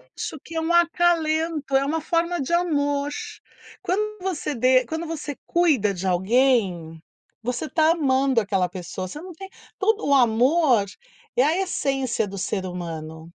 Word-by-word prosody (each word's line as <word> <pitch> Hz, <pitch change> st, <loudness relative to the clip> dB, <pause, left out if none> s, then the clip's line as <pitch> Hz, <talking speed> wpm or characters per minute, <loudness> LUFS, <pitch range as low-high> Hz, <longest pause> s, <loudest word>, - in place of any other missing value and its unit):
Acho 315 Hz, -, -5 dB
que 330 Hz, -, -10 dB
é 325 Hz, -, 0 dB
um 325 Hz, +2 st, 0 dB
acalento, 330 Hz, -4 st, +2 dB
é 270 Hz, +1 st, +3 dB
uma 315 Hz, +3 st, -1 dB
forma 340 Hz, +1 st, 0 dB
de 275 Hz, +6 st, -3 dB
amor. 290 Hz, -4 st, +1 dB, 0.7 s
Quando 425 Hz, +3 st, -2 dB
você 360 Hz, -5 st, -3 dB
de 255 Hz, +1 st, +4 dB
quando 320 Hz, +7 st, -4 dB
você 300 Hz, -3 st, -5 dB
cuida 290 Hz, -, +2 dB
de 185 Hz, 0 st, -6 dB
alguém, 185 Hz, -5 st, +1 dB, 0.4 s
você 250 Hz, +5 st, -2 dB
está 315 Hz, 0 st, +3 dB
amando 270 Hz, -6 st, +2 dB
aquela 195 Hz, -3 st, 0 dB
pessoa. 185 Hz, 0 st, -6 dB
Você 295 Hz, +12 st, -8 dB
não 365 Hz, +1 st, -9 dB
tem 385 Hz, +4 st, -10 dB, 0.3 s
todo 435 Hz, +2 st, +1 dB
o 285 Hz, -, +3 dB
amor 250 Hz, 0 st, +4 dB, 0.5 s
é 250 Hz, -, +4 dB
a 310 Hz, +5 st, +2 dB
essência 270 Hz, -, -1 dB
do 195 Hz, 0 st, -8 dB
ser 190 Hz, 0 st, -2 dB
humano. 160 Hz, -3 st, -6 dB
280 Hz, 155 wpm, -23 LUFS, 210-330 Hz, 0.7 s, de